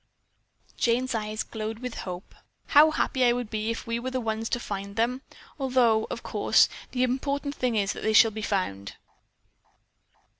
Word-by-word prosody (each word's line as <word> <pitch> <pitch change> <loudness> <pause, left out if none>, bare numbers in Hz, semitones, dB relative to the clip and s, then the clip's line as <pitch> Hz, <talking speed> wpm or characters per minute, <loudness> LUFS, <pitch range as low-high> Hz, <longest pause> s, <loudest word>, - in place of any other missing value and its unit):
Jane's 250 +2 +1
eyes 215 -1 -2
glowed 220 0 -5
with 250 0 -6 0.2
hope. 180 +1 -8 0.4
"How 300 +1 +7
happy 265 -4 0
I 240 -1 +5
would 245 -3 -4
be 215 0 -2
if 230 - -3
we 230 0 -2
were 255 +2 -3
the 260 0 -2
ones 225 -1 -2
to 240 - -1
find 200 -3 -6
them, 240 +3 0 0.4
although, 245 -5 +2
of - - -5
course, - - +3 0.2
the 250 -1 0
important 280 +3 -1
thing 250 -5 -1
is 200 -2 +1
that - - -8
they 220 - +1
shall 225 +1 +7
be 215 +1 -6
found." 100 - -2
230 Hz, 175 wpm, -27 LUFS, 215-255 Hz, 0.4 s, How